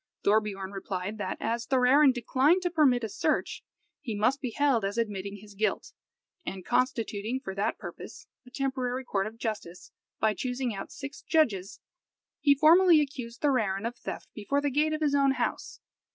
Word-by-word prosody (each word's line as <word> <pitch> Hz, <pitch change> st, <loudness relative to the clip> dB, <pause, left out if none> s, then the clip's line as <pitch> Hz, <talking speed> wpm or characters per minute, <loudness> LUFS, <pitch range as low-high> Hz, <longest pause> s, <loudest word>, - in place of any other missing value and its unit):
Thorbiorn 200 Hz, -2 st, +1 dB
replied, 195 Hz, +1 st, -5 dB
that -, -, -3 dB
as 235 Hz, +1 st, -2 dB
Thorarin 265 Hz, +2 st, +5 dB
declined 265 Hz, +8 st, +2 dB
to 355 Hz, -, 0 dB
permit 275 Hz, -7 st, +3 dB
a -, -, 0 dB
search, 205 Hz, -, -1 dB, 0.4 s
he 225 Hz, -4 st, -4 dB
must 250 Hz, +7 st, +1 dB
be 255 Hz, -, -2 dB
held 265 Hz, -3 st, +1 dB
as 200 Hz, +3 st, -2 dB
admitting 200 Hz, -3 st, -2 dB
his 205 Hz, +1 st, -13 dB
guilt; 215 Hz, +2 st, -2 dB, 0.5 s
and 190 Hz, -, -6 dB
constituting 230 Hz, -1 st, 0 dB
for 190 Hz, -8 st, -6 dB
that 200 Hz, +3 st, -1 dB
purpose -, -, -9 dB, 0.2 s
a 250 Hz, -, -16 dB
temporary 260 Hz, -1 st, -2 dB
court 195 Hz, -4 st, -1 dB
of 220 Hz, +1 st, -10 dB
justice, 210 Hz, -6 st, -5 dB, 0.3 s
by 220 Hz, -1 st, +2 dB
choosing 250 Hz, +2 st, -2 dB
out 195 Hz, -, -7 dB
six 280 Hz, 0 st, -8 dB
judges, 215 Hz, -, 0 dB, 0.6 s
he 285 Hz, -1 st, +4 dB
formally 330 Hz, +3 st, +6 dB
accused 250 Hz, -5 st, -4 dB
Thorarin 220 Hz, -8 st, +1 dB
of 240 Hz, +1 st, -3 dB
theft -, -, -7 dB
before 235 Hz, +7 st, -1 dB
the 285 Hz, 0 st, -1 dB
gate 300 Hz, +3 st, +2 dB
of 310 Hz, -, -3 dB
his 295 Hz, -2 st, +2 dB
own 275 Hz, -1 st, +4 dB
house. 245 Hz, -2 st, -3 dB
245 Hz, 170 wpm, -28 LUFS, 210-275 Hz, 0.6 s, formally